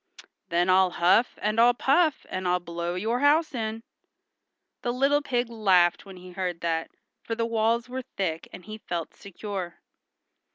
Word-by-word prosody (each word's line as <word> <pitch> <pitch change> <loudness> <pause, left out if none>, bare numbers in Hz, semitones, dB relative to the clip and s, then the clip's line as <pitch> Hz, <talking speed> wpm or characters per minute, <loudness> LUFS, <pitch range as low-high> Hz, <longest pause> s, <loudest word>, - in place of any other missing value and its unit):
"Then 175 +1 +2
I'll 185 0 +5
huff, 180 +8 +2
and 215 +2 +1
I'll 240 +1 +5
puff, 300 +4 +2
and 185 -1 -3
I'll 180 0 +2
blow 170 0 -4
your 225 +6 -1
house 295 +3 +3
in." 225 -2 -4 1.0
The 240 - -1
little 275 +4 +2
pig 245 -3 -1
laughed 195 -6 +2
when 190 -1 -11
he 180 0 -12
heard 180 -2 -4
that, 165 -1 -1 0.3
for 225 - -4
the 230 0 -1
walls 230 +1 +1
were 255 +1 -4
thick, 190 -10 -4
and 180 - -11
he 215 +1 -8
felt 170 -5 -5
secure. 195 -2 -6
210 Hz, 165 wpm, -26 LUFS, 180-240 Hz, 1.0 s, I'll